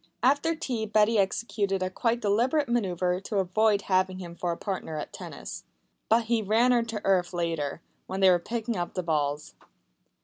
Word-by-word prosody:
After 285 +6 +3
tea 245 -9 -3
Betty 215 +1 +3
executed 195 -1 0
a 185 - -2
quite 235 +4 0
deliberate 250 +8 +2
manœuvre 185 -5 0
to 205 - -3
avoid 200 +2 +2
having 185 -1 +1
him 175 -2 -8
for 175 0 -2
a 170 - -3
partner 185 -6 -4
at 150 - -6
tennis. - - -8 0.5
But 230 +1 +4
he 230 0 +1
ran 225 +5 +3
her 240 -1 +4
to 230 -2 -5
earth 185 -2 +2
later, 165 -3 -2 0.3
when 190 - -4
they 190 -1 +6
were 175 - +4
picking 230 +4 -3
up 175 -2 -3
the 185 - -1
balls. 150 -2 -1
200 Hz, 180 wpm, -27 LUFS, 180-230 Hz, 0.5 s, they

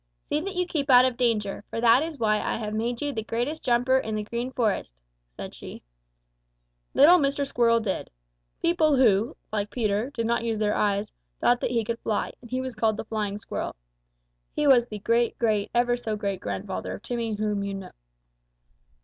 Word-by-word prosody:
'See 300 - +1
that 390 +3 -5
you 360 0 +1
keep 300 -5 -2
out 250 -1 +8
of 255 -2 0
danger, 220 -5 0
for - - -4
that 235 +2 +5
is 320 -1 -4
why 215 -3 +2
I - - -2
have 215 -1 -4
made 235 +4 -2
you 290 -1 -2
the 220 - -2
greatest 240 +8 -3
jumper 250 +2 +3
in 220 -4 -3
the 210 - -2
Green 235 +4 -4
Forest,' 215 - -1 0.4
said - - -7
she. - - -10 1.1
"Little 340 +6 +7
Mr. 280 -1 0
Squirrel 235 -3 +3
did. 210 -4 -3 0.5
People 325 -3 +3
who, 225 -4 +3
like 205 -1 -2
Peter, 215 0 -1
did 230 -5 -3
not 235 0 0
use 225 -1 -1
their 210 -1 +1
eyes, 205 0 0 0.3
thought 245 0 +3
that - - 0
he 235 -2 0
could 230 +1 -3
fly, 215 - -2
and 240 - -13
he 255 +2 -1
was 260 -1 -5
called 220 -1 +1
the - - -5
Flying 210 -2 -3
Squirrel. 210 - -5 0.8
He 300 - 0
was 250 -4 +5
the 210 - -6
great 230 +3 +1
great 215 -3 +1
ever 240 0 +2
so 225 -3 -3
great 200 -2 -3
grandfather 190 -1 -4
of - - -12
Timmy 230 -2 -2
whom 210 -1 -1
you 200 0 -3
both 195 - -5
know." - - -11
230 Hz, 200 wpm, -26 LUFS, 210-255 Hz, 1.1 s, out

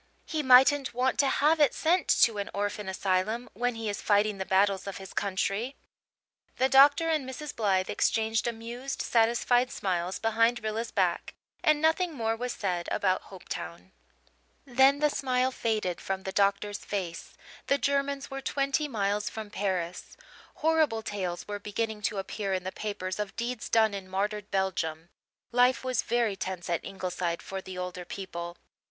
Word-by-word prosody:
He 315 -2 -2
mightn't 265 0 +5
want 255 +2 +1
to 280 - +5
have 300 +4 +3
it 290 -5 +4
sent 345 +3 +2 0.2
to 220 -3 +3
an 200 - -3
orphan 205 0 -2
asylum, 195 +5 0
when 245 +3 -1
he 225 -1 -4
is 205 -1 -3
fighting 205 -1 +2
the 190 - -3
battles 195 0 +2
of 195 - -5
his 190 -1 -10
country." 200 +5 -1 0.8
The 260 - +3
doctor 285 +5 +6
and 305 -5 0
Mrs. 290 +2 -6
Blythe 195 -4 +1
exchanged 225 +1 +1
amused, 235 +3 -4
satisfied 240 +2 +3
smiles 180 -3 -2
behind 230 +1 +2
Rilla's 220 +2 -2
back; 180 -4 0 0.3
and 305 -1 +4
nothing 320 +2 +2
more 225 -3 0
was 245 +2 -3
said 180 -6 -2
about 185 -2 +1
Hopetown. 90 - -8 0.7
Then 270 +3 +4
the 300 -1 +3
smile 255 -1 +1
faded 215 -8 -1
from 190 0 -3
the 190 - -4
doctor's 200 +1 +1
face; 180 -5 -5 0.3
the 280 - +3
Germans 280 0 -1
were 270 0 -4
twenty 275 +2 0
miles 205 -4 -1
from 215 -2 -7
Paris. 185 -4 -3 0.5
Horrible 310 -9 +3
tales 185 -4 -4
were 205 0 -4
beginning 210 +1 -3
to 210 - -7
appear 195 +1 -3
in 185 - -3
the 185 - -4
papers 190 -2 -4
of 205 -1 -4
deeds 240 -1 -3
done 220 -2 +4
in 195 -2 -6
martyred 205 +2 -2
Belgium. 170 -4 -1 0.4
Life 250 +2 +3
was 255 -1 0
very 235 -3 0
tense 185 -2 -4
at 170 - 0
Ingleside 180 -3 -3
for 195 0 -5
the 190 -1 -8
older 180 0 -5
people. 175 -2 -6
215 Hz, 165 wpm, -28 LUFS, 190-255 Hz, 0.8 s, doctor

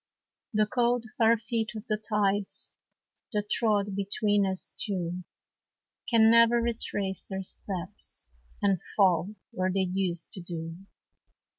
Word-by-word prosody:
The 215 -2 +3
cold, 240 +2 +1
far 230 0 +5
feet 225 0 -3
of 215 +1 -7
the 215 - 0
tides 205 -2 0 0.6
That 210 0 -2
trod 205 -3 +2
between 200 0 +1
us 190 -1 +1
two, 180 -3 -3 0.9
Can 225 -2 +6
never 230 +1 +6
retrace 205 -5 -2
their 190 -1 -4
steps, 185 - -2 0.4
And 195 -4 +2
fall 190 0 +3 0.2
where 185 0 -1
they 195 +1 +1
used 180 -3 +1
to 185 - -6
do. 165 -1 -6
205 Hz, 125 wpm, -28 LUFS, 190-220 Hz, 0.9 s, Can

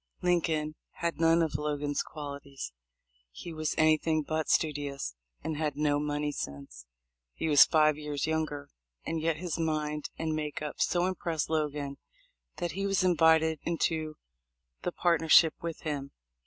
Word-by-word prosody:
Lin 180 -1 +3
coln 155 -2 -1 0.2
had 170 -1 -3
none 165 0 +5
of 160 - -2
Logan's 145 -1 -1
qualities. 140 - -7 0.6
He 165 - -9
was 155 -1 -2
any 155 0 +5
thing 155 -1 0
but 155 -1 -1
studious, 145 - 0 0.3
and 160 -1 -3
had 150 -2 -1
no 145 -1 +2
money 150 0 -1
sense. 70 - -7 0.5
He - - -2
was 145 -3 +8
five 155 -1 +3
years 150 -2 -2
younger, 155 -3 -2 0.3
and 165 -1 -2
yet 160 -1 +1
his 175 0 -3
mind 150 -2 -1
and 160 -1 -1
make 150 -1 -3
up 150 -1 -5
so 175 0 +2
impressed 170 -4 -2
Logan 145 -3 -1 0.6
that 175 -2 -3
he 195 +5 -2
was 195 -1 +2
invited 160 -2 +4
into 160 -2 -1 0.7
the - - -2
partnership 165 -1 +5
with 165 -1 -5
him. 145 -3 -3
155 Hz, 155 wpm, -30 LUFS, 145-165 Hz, 0.7 s, was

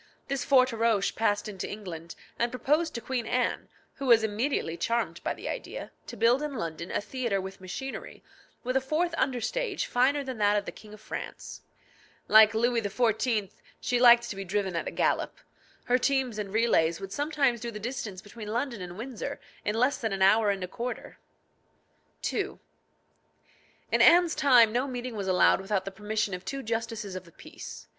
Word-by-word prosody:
This 275 -2 -1
Forteroche 230 -6 +3
passed 215 -1 +1
into 195 -4 -5
England, 170 -5 -7 0.2
and 235 - +2
proposed 305 +6 0
to 235 - -3
Queen 240 -1 -3
Anne, 250 0 -1 0.3
who 275 - -4
was 230 -2 +6
immediately 220 - -1
charmed 235 +6 -1
by - - -1
the - - -8
idea, - - -5 0.2
to - - -8
build 235 +5 +4
in 300 -2 -3
London 170 -4 -4
a - - 0
theatre 220 -1 -2
with 190 0 -7
machinery, 265 +9 -7 0.4
with 255 +1 -2
a 265 - +3
fourth 315 +6 0
under 265 -5 0
stage 420 - -2
finer 270 +3 +2
than 260 -4 -6
that 205 0 +4
of 205 - -1
the - - -5
King 215 -1 -13
of 215 - -18
France. - - -7 0.7
Like 220 0 +7
Louis 235 +1 +2
XIV., 220 -1 0 0.3
she 245 - 0
liked 240 -1 +7
to - - -5
be 195 - -5
driven 190 -1 -2
at 170 - -2
a - - 0
gallop. - - 0 0.5
Her 250 +1 +2
teams 260 -4 0
and 200 -2 -4
relays 200 -7 +2
would 195 0 -7
sometimes 285 -4 +1
do 235 - -3
the 210 -2 -7
distance 215 -5 -5
between 210 +1 -9
London 235 0 -2
and 180 0 -7
Windsor 240 +1 -5 0.2
in 210 - -1
less 250 +5 +2
than 225 -3 -2
an 190 -1 +1
hour 210 +2 +5
and 195 -2 -1
a - - -3
quarter. 240 +6 -6 1.1
II. - - -2 1.3
In - - +3
Anne's 345 -1 +6
time 245 -5 +6
no 250 +3 +1
meeting 250 -2 -5
was 200 -2 -3
allowed 185 +1 +4
without 195 -1 -1
the 195 - -4
permission 210 +1 -2
of 180 0 -5
two 275 +4 -5
justices 225 -3 -3
of 185 - -5
the 170 - -18
peace. - - -10
225 Hz, 185 wpm, -28 LUFS, 200-255 Hz, 1.3 s, Like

